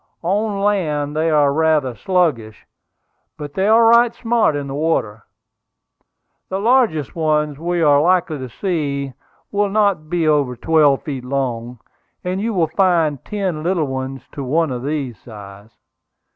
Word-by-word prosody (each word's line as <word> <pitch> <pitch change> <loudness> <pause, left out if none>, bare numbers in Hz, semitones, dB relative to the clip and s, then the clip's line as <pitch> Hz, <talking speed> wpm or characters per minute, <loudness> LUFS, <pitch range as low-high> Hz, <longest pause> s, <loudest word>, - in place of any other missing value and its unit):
On 200 +3 -1
land 150 -8 0
they 160 +1 +1
are 145 -2 +3
rather 155 -4 +1
sluggish; 145 - -1 0.7
but 145 -2 -8
they 190 +3 0
are 225 +2 +5
right 235 +1 +5
smart 230 -8 +1
in 145 -1 -3
the 135 - -6
water. 140 -8 -1 1.2
The 190 - -2
largest 220 - +1
ones 150 -3 0
we 175 +1 -1
are 145 -2 +5
likely 175 -2 +1
to 130 -1 -6
see 140 - -3 0.4
will 205 0 +1
not 200 -7 +1
be 170 -2 0
over 145 -5 +1
twelve 150 0 +2
feet 135 -4 -5
long; 125 -2 -3 0.5
and 185 +2 -2
you 230 +2 -1
will 180 -6 +1
find 165 -7 +2
ten 190 -7 -3
little 170 -1 0
ones 130 0 -5
to 140 - -6
one 155 +3 0
of 125 -1 -4
this 135 -6 -4
size. 100 -2 -12
155 Hz, 150 wpm, -19 LUFS, 135-185 Hz, 1.2 s, are